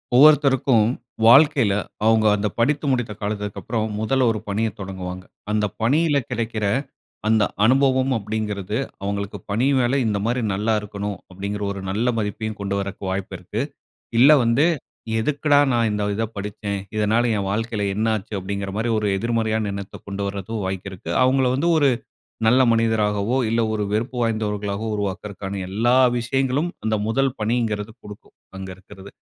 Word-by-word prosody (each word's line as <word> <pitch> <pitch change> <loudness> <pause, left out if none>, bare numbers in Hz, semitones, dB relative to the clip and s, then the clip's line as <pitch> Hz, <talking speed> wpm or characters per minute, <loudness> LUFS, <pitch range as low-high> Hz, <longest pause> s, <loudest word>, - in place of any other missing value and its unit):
ஒவ்வொருத்தருக்கும் 135 -5 +5 0.4
வாழ்க்கையில 135 -3 +6 0.3
அவுங்க 110 -1 +4
அந்த 105 +1 -1
படித்து 145 +6 +1
முடித்த 120 -4 0
காலத்திற்கு 105 -1 -3
அப்பறம் 110 -2 -2
முதல்ல 130 +3 +2
ஒரு 110 - -3
பணிய 110 +3 0
தொடங்குவாங்க. 95 -1 -6 0.3
அந்த 105 0 +1 0.2
பணியில 145 +6 +3
கெடைக்கிற 115 -3 -3 0.6
அந்த 110 -1 +4 0.2
அனுபவம் 130 +1 +3
அப்பிடிங்கிறது. 105 -1 -3 0.3
அவுங்களுக்கு 100 0 -3
பணி 115 +5 +1
மேல 125 +2 +2
இந்தமாரி 110 +4 0
நல்லா 105 +3 0
இருக்கணும் 105 -1 -5
அப்பிடிங்கிற 100 +2 -4
ஒரு 100 - -5
நல்ல 110 +6 0
மதிப்பையும் 110 +1 -3
கொண்டு 100 0 -2
வரக்கு 100 0 -5
வாய்ப்பு 95 0 -3
இருக்கு. 90 +5 -4 0.6
இல்ல, 135 +5 +8
வந்து 115 +7 +3 0.5
எதுக்குடா! 145 +3 +2
நான் 115 -2 +2
இந்த 105 0 -1
இத 110 +2 -1
படிச்சேன்? 100 0 -4 0.2
இதனால 110 +2 +2
என் 100 -1 -2
வாழ்க்கையில 110 0 -1
என்ன 110 +3 0
ஆச்சு? 105 +1 -9
அப்பிடிங்கிற 100 +1 -4
மாரி 115 +2 0
ஒரு 105 - -1
எதிர்மறையான 110 -1 0
எண்ணத்த 100 -1 -7
கொண்டுவர்றது 100 +1 -4
வாய்ப்பு 95 +1 -4
இருக்கு. 95 - -8
அவங்கள 130 +1 +3
வந்து 145 +6 +1
ஒரு 145 -2 +4 0.6
நல்ல 125 +4 +5
மனிதராகவோ! 110 0 +1
இல்ல 115 +1 +2
ஒரு 105 -1 -1
வெறுப்பு 115 +4 -1
வாய்ந்தவர்களாகவோ! 105 -1 -2
உருவாக்கிறகான 100 0 -4
எல்லா 120 +5 +2 0.2
விஷயங்களும் 135 +6 0 0.2
அந்த 110 0 +2
முதல் 135 +3 +1
பணிங்கிறது 110 -1 -1
குடுக்கும். 105 -1 -13 0.2
அங்க 95 0 -6
இருக்கிறது. 95 +1 -13
110 Hz, 145 wpm, -22 LUFS, 100-120 Hz, 0.6 s, இல்ல